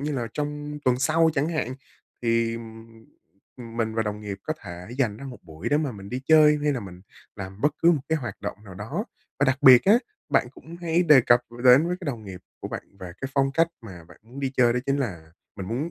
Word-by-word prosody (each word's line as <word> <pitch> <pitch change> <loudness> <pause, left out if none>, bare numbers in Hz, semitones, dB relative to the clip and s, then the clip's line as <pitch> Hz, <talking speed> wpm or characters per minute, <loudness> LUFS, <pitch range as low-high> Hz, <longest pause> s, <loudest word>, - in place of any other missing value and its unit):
như 150 +1 -2
là 120 -4 -2
trong 150 0 -4
tuần 125 -1 +3
sau 160 +4 +3
chẳng 145 +1 +1
hạn 155 -7 -2 0.5
thì, 115 -1 +1
ừm, 115 -1 -9 0.7
ừm, 115 -2 -10
mình 110 -1 -1
và 115 - +1
đồng 105 -1 -4
nghiệp 100 -2 -6
có 155 - -2
thể 90 +2 -9
dành 115 -7 +1
ra 140 - -10
một 125 -4 -8
buổi 80 +6 -6
để 145 - +3
mà 150 -4 -1
mình 100 -2 -10
đi 125 +3 -4
chơi 155 -1 +6
hay 150 - +2
là 130 - -3
mình 90 -3 -10 0.4
làm 95 0 -8
bất 150 +3 +2
cứ 170 - +5
một 155 - 0
cái 160 0 +1
hoạt 120 -4 -6
động - - -4
nào 95 -3 -11
đó. 105 +4 -4 0.3
Và - - +3
đặc 130 0 +1
biệt 125 -2 +9
á, 210 +4 +6 0.3
bạn - - +2
cũng 165 +1 -12
hãy 170 0 +1
đề 150 -6 +7
cập 120 0 +4
r 120 +1 -9
đến 130 +5 +7
với 180 - -1
cái - - -8
đồng 120 -6 -4
nghiệp 95 -3 -9 0.2
của - - -5
bạn - - -5 0.2
về 90 -2 -7
cái 135 - -3
phong 135 -1 +2
cách 165 +3 +3
mà 90 -7 -11
bạn 85 +1 -18
muốn 120 +5 -11
đi 135 -1 -1
chơi, 120 -2 +5
đó 125 - 0
chính 140 - +1
là 85 - -4 0.2
mình 95 -2 -6
muốn 135 +9 -2
125 Hz, 255 wpm, -25 LUFS, 105-150 Hz, 0.7 s, biệt